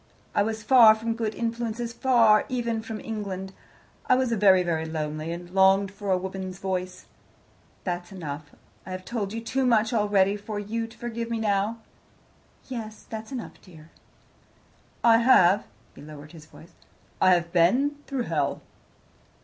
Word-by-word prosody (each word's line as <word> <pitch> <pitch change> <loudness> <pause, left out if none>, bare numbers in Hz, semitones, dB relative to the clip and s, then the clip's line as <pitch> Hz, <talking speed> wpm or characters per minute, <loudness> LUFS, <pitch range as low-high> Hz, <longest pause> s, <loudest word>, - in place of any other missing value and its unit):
I - - +2
was 220 +1 -2
far 225 -2 +7
from 225 +1 -3
good 225 -2 -3
influences 235 0 -3
far 230 -4 +4
even 235 -3 -2
from 220 -1 -6
England. 195 -3 -5 0.5
I - - +5
was 255 -2 0
very, 195 -4 +5
very 165 -2 -1
lonely, 155 0 -4
and 175 +1 -7
longed 190 +1 +4
for 200 0 -7
a 185 - +3
woman's 190 0 -6
voice. 185 -1 -4 0.8
That's 175 0 -4
enough. 150 -5 -7 0.3
I 185 - -7
have 185 0 -7
told 215 -5 -3
you 230 +1 -4
too 265 +4 -1
much 230 -2 +2
already 205 -2 +2
for 210 +1 -6
you 225 +3 -3
to 230 - -17
forgive 235 -1 -5
me 230 - -1
now." 215 +1 -1 0.9
"Yes, 220 -4 -7
that's 220 +1 -7
enough, 250 -4 -7
dear." 160 -3 -16 1.1
"I 230 -1 +6
have" 205 -5 +5 0.3
he - - -14
lowered 150 0 -11
his 160 -3 -14
voice 160 - -16 0.5
"I 185 -1 +6
have 170 -1 -3
been 250 +13 +3
through 270 -3 -2
hell." 150 -8 -2
205 Hz, 155 wpm, -26 LUFS, 185-230 Hz, 1.1 s, far